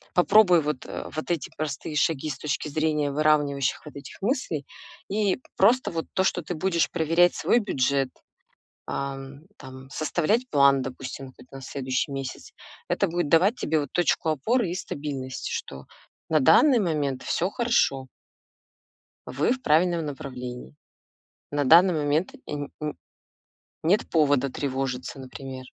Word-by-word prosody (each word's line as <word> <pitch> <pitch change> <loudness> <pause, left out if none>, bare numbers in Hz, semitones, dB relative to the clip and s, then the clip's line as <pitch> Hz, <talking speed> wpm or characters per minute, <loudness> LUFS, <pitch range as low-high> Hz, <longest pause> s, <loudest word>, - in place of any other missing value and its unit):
попробуй 180 -2 +6
вот, 150 -3 -3
э, - - -6
вот 155 +2 -4
эти 165 - -2
простые 150 0 -4
шаги 155 0 +1
с 135 - -4
точки 150 +1 -3
зрения 150 -1 0
выравнивающих 145 -2 +1
вот 150 - -11
этих 140 - -11
мыслей. 200 - -1 0.4
И 205 +1 +1 0.2
просто 240 +6 +4
вот 165 -1 -3
то, 190 - +2
что 180 - +1
ты 175 - -4
будешь 170 0 0
проверять 170 +1 +3
свой 240 - +3
бюджет, 135 - 0 0.8
ам, 135 +1 -5 0.2
там, 130 -1 -11
составлять 190 - 0
план, 140 -1 +5
допустим, 130 +1 -7
какой-то 130 +1 -14
на 135 - -9
следующий 130 +1 -2
месяц. 135 -2 -6 0.4
Это - - +1
будет 170 -2 -1
давать 185 - +4
тебе, 160 -8 0
вот, 145 - -6
точку 175 -2 +1
опоры 190 - 0
и - - -3
стабильность, 140 -7 -5
что 70 0 -5 0.4
на 155 -2 +3
данный 250 - +6
момент 150 -7 -1
всё 180 +3 0
хорошо 140 - +1 1.2
вы 145 - 0
в 260 0 -1
правильном 165 +1 +2
направлении. 125 - -7 0.8
На 145 -1 0
данный 175 +5 +7
момент, 155 - 0
э, - - -12
нь 145 -1 -4
н 150 0 -4 0.9
нет 190 +6 +2
повода 145 -4 +2
тревожиться, 135 -1 -3
например. 130 0 -8
150 Hz, 145 wpm, -25 LUFS, 135-175 Hz, 1.2 s, данный